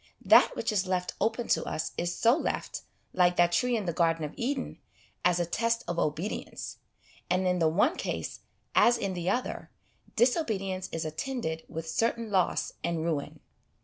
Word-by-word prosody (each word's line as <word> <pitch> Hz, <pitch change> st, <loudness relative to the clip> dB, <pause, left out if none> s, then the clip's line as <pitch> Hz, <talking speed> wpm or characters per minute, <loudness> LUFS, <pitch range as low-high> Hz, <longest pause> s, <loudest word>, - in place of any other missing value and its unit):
That -, -, +6 dB
which -, -, -1 dB
is 195 Hz, -3 st, 0 dB
left 180 Hz, -1 st, -1 dB
open 225 Hz, +3 st, 0 dB
to -, -, +3 dB
us 155 Hz, -, -3 dB
is 175 Hz, 0 st, -2 dB
so 235 Hz, +2 st, +5 dB
left, -, -, -3 dB, 0.3 s
like 180 Hz, -1 st, +4 dB
that 175 Hz, 0 st, +4 dB
tree 245 Hz, +7 st, +2 dB
in 210 Hz, -, -3 dB
the 170 Hz, -, -1 dB
Garden 165 Hz, -1 st, +2 dB
of 150 Hz, -, -7 dB
Eden, 260 Hz, +2 st, -3 dB, 0.4 s
as 180 Hz, 0 st, +3 dB
a 175 Hz, -, +1 dB
test 230 Hz, +6 st, 0 dB
of 170 Hz, 0 st, -2 dB
obedience; 155 Hz, +7 st, -3 dB, 0.5 s
and 185 Hz, +1 st, +2 dB
in 180 Hz, 0 st, +2 dB
the 160 Hz, -2 st, +4 dB
one 240 Hz, -, +2 dB
case, -, -, -4 dB, 0.3 s
as 240 Hz, 0 st, +5 dB
in 195 Hz, -1 st, -2 dB
the 175 Hz, 0 st, -2 dB
other, 250 Hz, -, -2 dB, 0.5 s
disobedience 210 Hz, -, +1 dB
is 165 Hz, 0 st, -3 dB
attended 160 Hz, -, -3 dB
with 165 Hz, 0 st, -5 dB
certain 230 Hz, +5 st, 0 dB
loss 185 Hz, -3 st, +1 dB
and 170 Hz, -2 st, -1 dB
ruin. 155 Hz, -4 st, -3 dB
185 Hz, 175 wpm, -29 LUFS, 170-230 Hz, 0.5 s, That